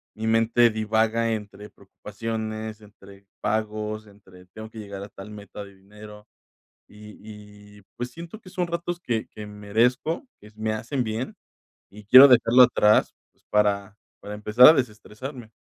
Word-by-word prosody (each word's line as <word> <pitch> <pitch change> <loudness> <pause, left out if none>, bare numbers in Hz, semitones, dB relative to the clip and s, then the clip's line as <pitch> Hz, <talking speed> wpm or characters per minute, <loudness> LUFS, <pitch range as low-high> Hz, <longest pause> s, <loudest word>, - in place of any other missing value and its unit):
mi 110 +1 -4
mente 115 +1 +3
divaga 110 +1 0
entre 105 -1 -8
preocupaciones, 110 0 -7
entre 100 -1 -17 0.2
pagos, 110 0 -3
entre 95 -3 -18
"Tengo 110 +4 -11
que 110 0 -11
llegar 100 -1 -8
a 100 - -10
tal 95 +2 -12
meta 105 0 -10
de 100 -1 -15
dinero", 105 +2 -14 0.6
y 105 0 -14 0.6
y - - -19
pues, 120 +1 -5
siento 170 +6 -11
que 185 - -15
son 180 -1 -2
ratos 170 +1 -4
que 115 -8 -3
que 105 -1 -10
merezco, 115 - -1
que 105 - -16
s 105 - -24
me 110 0 -2
hacen 120 +4 -3
bien 110 +3 -4 0.6
y 105 +1 -14
quiero 130 +7 +9
dejarlo 125 0 +6
atrás, 105 -2 +3 0.2
pues, - - -39
para 105 -1 +1 0.3
para 105 0 -8
empezar 105 +4 +5
a - - +9
desestresarme. 120 0 -6
110 Hz, 155 wpm, -24 LUFS, 105-115 Hz, 0.6 s, quiero